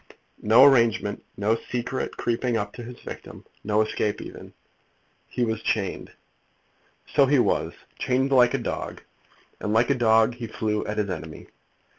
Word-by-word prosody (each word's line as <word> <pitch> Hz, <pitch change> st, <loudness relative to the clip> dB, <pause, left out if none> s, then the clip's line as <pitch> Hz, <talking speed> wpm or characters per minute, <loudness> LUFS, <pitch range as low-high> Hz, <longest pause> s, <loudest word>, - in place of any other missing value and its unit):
No 115 Hz, +5 st, +7 dB
arrangement; 115 Hz, -6 st, +3 dB
no 105 Hz, +2 st, +2 dB
secret 125 Hz, +2 st, -4 dB
creeping 120 Hz, 0 st, 0 dB
up 105 Hz, -1 st, -3 dB
to -, -, -9 dB
his 120 Hz, +1 st, -9 dB
victim; -, -, -10 dB, 0.2 s
no 105 Hz, 0 st, +2 dB
escape 105 Hz, -1 st, -2 dB
even?" -, -, -10 dB, 0.7 s
"He 120 Hz, -, -1 dB
was 110 Hz, -1 st, -2 dB
chained." 100 Hz, -4 st, -2 dB, 1.0 s
"So 140 Hz, -, +5 dB
he 145 Hz, +1 st, +4 dB
was; 125 Hz, -, +1 dB, 0.3 s
chained 130 Hz, +2 st, +1 dB
like 125 Hz, -2 st, +5 dB
a -, -, -4 dB
dog; -, -, -4 dB, 0.6 s
and 105 Hz, 0 st, -2 dB
like 115 Hz, +5 st, +3 dB
a -, -, +5 dB
dog 115 Hz, -2 st, +3 dB
he 120 Hz, -1 st, -7 dB
flew 105 Hz, -1 st, -2 dB
at 105 Hz, -, -4 dB
his 105 Hz, -2 st, -1 dB
enemy. 80 Hz, -3 st, -8 dB
115 Hz, 155 wpm, -25 LUFS, 105-125 Hz, 1.0 s, No